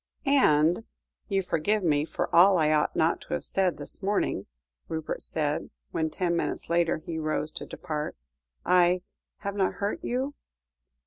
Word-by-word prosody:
"And 175 Hz, -, +4 dB, 0.4 s
you 195 Hz, -2 st, +1 dB
forgive 195 Hz, +5 st, 0 dB
me 150 Hz, -3 st, +2 dB
for -, -, -2 dB
all 185 Hz, +2 st, +7 dB
I 155 Hz, -2 st, +3 dB
ought 150 Hz, -1 st, +2 dB
not -, -, +2 dB
to -, -, -6 dB
have 75 Hz, -, -4 dB
said 185 Hz, -4 st, +1 dB
this 145 Hz, -, -6 dB
morning," 195 Hz, -, 0 dB, 0.4 s
Rupert 160 Hz, -1 st, -4 dB
said 150 Hz, -1 st, -2 dB, 0.2 s
when, 160 Hz, -1 st, 0 dB
ten 170 Hz, +2 st, -1 dB
minutes 170 Hz, -, -2 dB
later, 170 Hz, -1 st, +2 dB
he 160 Hz, +1 st, -5 dB
rose 155 Hz, 0 st, -1 dB
to -, -, -7 dB
depart. 155 Hz, -3 st, -4 dB, 0.5 s
"I 180 Hz, 0 st, +4 dB, 0.4 s
have 200 Hz, -, -3 dB
not 195 Hz, -2 st, +1 dB
hurt 200 Hz, +1 st, -2 dB
you?" 260 Hz, +4 st, -1 dB
170 Hz, 155 wpm, -28 LUFS, 155-195 Hz, 0.5 s, all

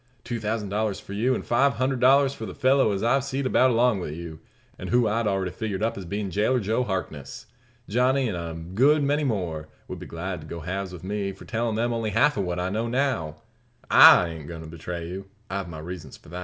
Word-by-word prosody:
Two 120 Hz, -1 st, -4 dB
thousand 110 Hz, -1 st, -2 dB
dollars 105 Hz, -1 st, -1 dB
for 100 Hz, -, -10 dB
you, 120 Hz, +6 st, +1 dB
an' -, -, -4 dB
five 135 Hz, +4 st, +3 dB
hundred 130 Hz, 0 st, 0 dB
dollars 135 Hz, +2 st, +5 dB
for 115 Hz, -5 st, -7 dB
the 90 Hz, -, -8 dB
fellow 130 Hz, -3 st, +3 dB
as 100 Hz, 0 st, -2 dB
I've 130 Hz, +3 st, +3 dB
seed 135 Hz, 0 st, -3 dB
about 130 Hz, 0 st, +4 dB
along 120 Hz, -3 st, +3 dB
wi' 90 Hz, -, -4 dB
you, 80 Hz, +1 st, -7 dB, 0.4 s
and -, -, -6 dB
who 120 Hz, -1 st, +3 dB
I'd 110 Hz, +1 st, 0 dB
already 95 Hz, -2 st, 0 dB
figured 105 Hz, -1 st, -3 dB
up 115 Hz, -, 0 dB
as 95 Hz, -, -7 dB
bein' 100 Hz, +2 st, -3 dB
jailer 110 Hz, +7 st, +2 dB
Joe 110 Hz, +4 st, 0 dB
Harkness. 90 Hz, -, -5 dB, 0.4 s
Johnny, 130 Hz, +4 st, +2 dB
an' 105 Hz, -, -2 dB
a 85 Hz, -1 st, -5 dB
good 120 Hz, -, +2 dB
many 145 Hz, +2 st, +1 dB
more, 90 Hz, -, -2 dB, 0.2 s
would -, -, -7 dB
be -, -, -9 dB
glad 85 Hz, +1 st, -5 dB
to 75 Hz, -, -11 dB
go 85 Hz, +1 st, -6 dB
halves 95 Hz, +3 st, -4 dB
with 90 Hz, -2 st, -10 dB
me, 100 Hz, 0 st, -2 dB
for -, -, -13 dB
tellin' 115 Hz, -1 st, -1 dB
them 120 Hz, +2 st, 0 dB
only 115 Hz, -2 st, -1 dB
half 140 Hz, +8 st, +3 dB
of 100 Hz, -, -1 dB
what 90 Hz, 0 st, -2 dB
I 90 Hz, +1 st, -1 dB
now 110 Hz, +3 st, -1 dB
know. 120 Hz, -, -1 dB, 0.6 s
I 85 Hz, -, +9 dB
ain't 80 Hz, -3 st, -8 dB
goin' 85 Hz, -2 st, -7 dB
to 80 Hz, -, -9 dB
betray 85 Hz, +1 st, -6 dB
you. 95 Hz, +2 st, -7 dB, 0.2 s
I've 95 Hz, -2 st, -3 dB
my 80 Hz, -, -8 dB
reasons 80 Hz, -2 st, -8 dB
for -, -, -18 dB
not. 90 Hz, +2 st, -6 dB
105 Hz, 235 wpm, -25 LUFS, 90-120 Hz, 0.6 s, I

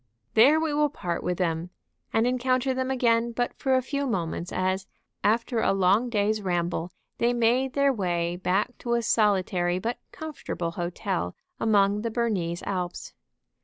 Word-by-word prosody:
There 275 Hz, +8 st, +6 dB
we 320 Hz, -2 st, -1 dB
will 295 Hz, 0 st, +2 dB
part 180 Hz, -, -3 dB
with 180 Hz, -1 st, -1 dB
them, 170 Hz, -1 st, -1 dB, 0.4 s
and 225 Hz, +1 st, +2 dB
encounter 255 Hz, +1 st, +1 dB
them 260 Hz, 0 st, -2 dB
again 235 Hz, -2 st, +2 dB
but 245 Hz, +1 st, -1 dB
for 265 Hz, -1 st, +1 dB
a 255 Hz, -, +2 dB
few 280 Hz, +1 st, -2 dB
moments 175 Hz, -5 st, -2 dB
as, 185 Hz, +1 st, -1 dB, 0.4 s
after 230 Hz, +2 st, +1 dB
a -, -, +3 dB
long 195 Hz, +5 st, +3 dB
day's 215 Hz, -1 st, +1 dB
ramble, 175 Hz, -2 st, -1 dB, 0.3 s
they 240 Hz, +1 st, +3 dB
made 245 Hz, +3 st, +2 dB
their 280 Hz, -1 st, +3 dB
way 175 Hz, -5 st, -1 dB
back 190 Hz, +6 st, 0 dB
to 235 Hz, -1 st, 0 dB
a 235 Hz, -, 0 dB
solitary 185 Hz, -5 st, +2 dB
but 230 Hz, +6 st, -3 dB
comfortable 230 Hz, -, -5 dB
hotel 170 Hz, -, -3 dB, 0.2 s
among 205 Hz, -1 st, +3 dB
the 230 Hz, -, -2 dB
Bernese 200 Hz, -8 st, -1 dB
Alps. 180 Hz, -3 st, -4 dB
215 Hz, 160 wpm, -26 LUFS, 180-245 Hz, 0.4 s, There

